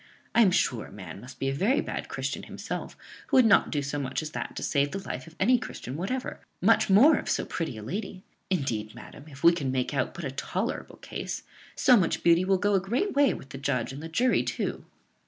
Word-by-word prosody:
I 235 - +5
am 210 - +6
sure 125 -10 +1
a - - -15
man 95 -2 -9
must 125 +1 -11
be 135 - -2
a 135 - 0
very 210 - +2
bad - - -4
Christian - - -3
himself - - -6 0.3
who - - +3
would 255 - +7
not 220 - +5
do 145 -1 -1
so 140 +1 -3
much 135 +2 -2
as 155 - -6
that - - -5
to - - -4
save 140 -1 +1
the 190 +6 -6
life 130 - -5
of 165 - -14
any 245 +6 +4
Christian 130 - -7
whatever, 225 - -3 0.2
much - - +4
more 240 +12 +7
of - - -6
so - - 0
pretty 160 -9 -4
a 110 - -7
lady. 190 - -5 0.3
Indeed, 115 - -2
madam, 145 - -12
if 140 -2 -13
we 170 - +8
can 140 -6 -2
make 130 +1 -1
out 140 - -1
but 175 - -6
a 135 - -3
tolerable 135 - -3
case, - - -5 0.3
so 255 -3 +6
much 180 -5 0
beauty 170 +1 +5
will 190 +1 +3
go 205 +2 +1
a 195 - +4
great 245 - -1
way 285 -1 +4
with 135 - -11
the 135 - -8
judge 135 -3 -1
and 140 - -7
the 165 - -7
jury 245 +10 +2
too." - - -3
165 Hz, 240 wpm, -28 LUFS, 135-200 Hz, 0.3 s, we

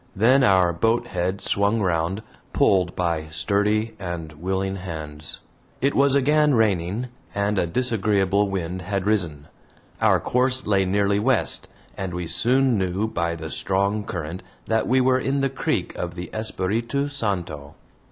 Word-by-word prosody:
Then 125 +7 +4
our 95 -5 +4
boat 115 +8 +1
head 95 +1 -2
swung 100 +3 +1
round, 90 +1 0 0.3
pulled 90 -3 +2
by 85 -3 -1
sturdy 105 +6 0
and 85 -4 -5
willing 95 +4 -2
hands. 80 -5 -5 0.4
It 140 +2 +1
was 140 0 +4
again 150 +1 +3
raining, 105 +2 0 0.3
and 100 0 +1
a 85 - +1
disagreeable 100 -2 +1
wind 90 -1 -3
had 95 +1 -2
risen. 85 -9 0 0.5
Our - - +4
course 130 +1 +1
lay 100 -2 +2
nearly 100 +1 +1
west, 120 +1 +2 0.3
and 95 -2 -4
we 90 -1 -3
soon 125 +5 +2
knew 95 +3 -1
by 85 -5 -2
the 80 -1 -7
strong 100 +2 0
current 85 -2 -5 0.2
that 110 0 0
we 130 +2 +3
were 130 0 +3
in 135 +1 0
the 135 - +1
creek 135 - -2
of 85 -1 -4
the 90 0 -7
Espiritu 115 +6 -1
Santo. 90 - -4
100 Hz, 150 wpm, -23 LUFS, 90-115 Hz, 0.5 s, Then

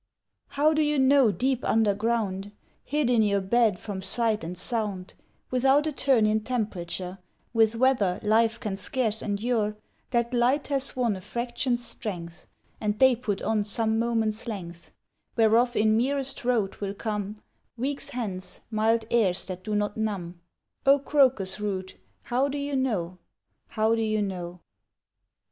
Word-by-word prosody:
How 305 +2 +4
do 310 - +2
you 300 -1 +1
know, 265 -3 +5
deep 255 +3 -1
underground, 210 -2 0 0.3
Hid 295 -1 0
in 240 -2 +4
your 200 -2 +2
bed 215 +1 +2
from 195 0 -6
sight 215 +2 0
and 175 +2 -6
sound, 200 -2 -3 0.4
Without 270 +4 +3
a 310 - 0
turn 265 -5 +3
in 215 +1 +2
temperature, 195 -5 -3 0.3
With 225 -1 +3
weather 230 -7 +2
life 225 +2 +3
can 195 -2 -3
scarce 220 +2 -1
endure, 210 0 -1 0.3
That 235 0 0
light 250 +5 +2
has 275 -1 +1
won 240 -5 +1
a 190 - -8
fraction's 240 +3 -2
strength, 175 -8 -6 0.3
And 210 -1 -1
day 260 0 +6
put 215 -5 -3
on 215 -2 +1
some 220 +2 0
moments' 225 -1 -1
length, 170 -6 -7 0.4
Whereof 235 +2 +3
in 215 0 +3
merest 270 +3 0
rote 230 -6 0
will 200 0 -3
come, 210 -1 -4 0.4
Weeks 275 +3 -2
hence, 205 -8 -5
mild 220 +1 +2
airs 200 -6 +2
that 185 -1 -7
do 215 -1 -2
not 205 0 -1
numb; 185 -6 -3 0.4
O 275 0 +6
crocus 260 -9 +2
root, 190 -3 -3 0.3
how 255 +3 +1
do 285 +1 -3
you 285 0 -2
know, 190 -10 -1 0.5
How 220 +1 +1
do 225 - +1
you 215 -1 +1
know? 180 -2 -5
220 Hz, 150 wpm, -26 LUFS, 200-250 Hz, 0.5 s, day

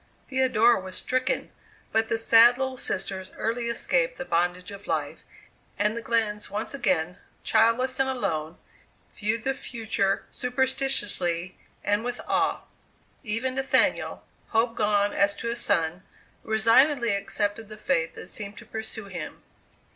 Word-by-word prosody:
Theodora 250 -4 +4
was 185 0 -6
stricken; 255 0 -1 0.4
but 225 0 +1
the 225 - +1
sad 230 +2 +7
little 265 -1 -2
sisters 190 -6 -2
early 235 +1 -1
escaped - - 0
the 265 - -5
bondage 180 +1 0
of 200 0 -10
life, - - -2 0.6
and 210 +2 +1
the 235 - -3
Glenns 220 -3 0
once 210 +5 -4
again, 180 -8 0 0.2
childless 230 +4 +3
and 265 0 +2
alone, 165 -10 -2 0.6
viewed 215 +2 -2
the 270 - +1
future 220 -6 -2
superstitiously 250 -9 0 0.3
and 205 +2 +1
with 245 0 -3
awe. - - +1 0.6
Even 230 +3 -1
Nathaniel, 270 0 +1 0.2
hope 230 +1 +1
gone 205 -2 +2
as 200 0 +2
to 230 +2 -3
a - - -2
son, 175 -6 0 0.4
resignedly 230 +3 +4
accepted 205 +2 -2
the 215 - -8
fate 165 -5 0
that - - -9
seemed 205 -1 -6
to 235 - -11
pursue 220 -1 -6
him. 180 -5 -7
225 Hz, 140 wpm, -26 LUFS, 200-245 Hz, 0.6 s, sad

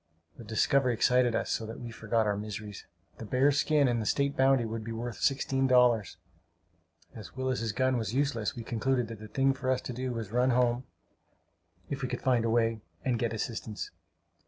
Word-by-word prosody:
The - - -11
discovery 125 +3 +2
excited 125 +1 +3
us - - -1
so 110 - -2
that 110 - -7
we 120 -1 -7
forgot 110 0 0
our 105 -1 +1
miseries. 105 0 -7 0.3
The - - -6
bear's 135 +6 +3
skin 150 -3 +3
and 120 -2 +1
the 105 - -3
state 140 0 +1
bounty 130 -2 +3
would 110 0 -4
be 115 - -6
worth 115 0 -5
sixteen 135 -1 +1
dollars. 125 -5 +3 1.0
As 105 -3 -10
Willis's 130 -4 -1
gun 130 +3 +1
was 110 -3 -2
useless, 125 -4 0
we 120 - -6
concluded 120 +1 0
that 115 -2 -8
the 110 - -9
thing 135 +5 +2
for 130 -1 -4
us 130 -1 +2
to 125 - -6
do 130 +1 -3
was 115 -4 -4
to - - -14
run 125 +1 +3
home 125 0 +2 1.1
if 140 - -3
we 130 - -2
could 125 - -4
find 125 -4 +3
the - - +1
way 115 -1 +1 0.2
and 125 -3 +1
get 115 -1 0
assistance. 110 -1 -4
120 Hz, 205 wpm, -30 LUFS, 110-130 Hz, 1.1 s, excited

